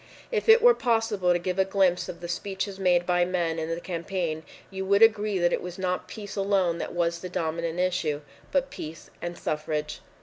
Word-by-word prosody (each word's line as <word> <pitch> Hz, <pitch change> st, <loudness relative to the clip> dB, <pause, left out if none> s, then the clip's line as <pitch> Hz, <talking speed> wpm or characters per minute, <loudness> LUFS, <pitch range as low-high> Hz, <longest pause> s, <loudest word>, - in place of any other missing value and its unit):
If 450 Hz, -1 st, -1 dB
it 455 Hz, +1 st, +8 dB
were 485 Hz, 0 st, +8 dB
possible 225 Hz, -, +1 dB
to 175 Hz, -, +4 dB
give 180 Hz, +1 st, -3 dB
a -, -, +6 dB
glimpse 190 Hz, -2 st, +1 dB
of 170 Hz, -, -8 dB
the 175 Hz, -, -5 dB
speeches 195 Hz, +2 st, -4 dB
made 180 Hz, -2 st, +3 dB
by 175 Hz, 0 st, +3 dB
men 175 Hz, -2 st, -1 dB
in 160 Hz, 0 st, -3 dB
that 165 Hz, +1 st, -3 dB
campaign, 170 Hz, -2 st, -3 dB, 0.3 s
you 190 Hz, 0 st, -4 dB
would 200 Hz, +3 st, +4 dB
agree 210 Hz, -2 st, +4 dB
that 175 Hz, -1 st, +2 dB
it -, -, 0 dB
was 180 Hz, 0 st, -7 dB
not 185 Hz, -1 st, -2 dB
peace 205 Hz, -2 st, -8 dB
alone 195 Hz, -4 st, +1 dB
that -, -, -4 dB
was 170 Hz, -1 st, 0 dB
the 185 Hz, -, -6 dB
dominant 165 Hz, 0 st, -2 dB
issue, 180 Hz, -5 st, 0 dB, 0.3 s
but 275 Hz, -1 st, +1 dB
peace 155 Hz, +1 st, -8 dB
and 175 Hz, 0 st, -5 dB
suffrage. 150 Hz, 0 st, -3 dB
180 Hz, 205 wpm, -27 LUFS, 170-195 Hz, 0.3 s, it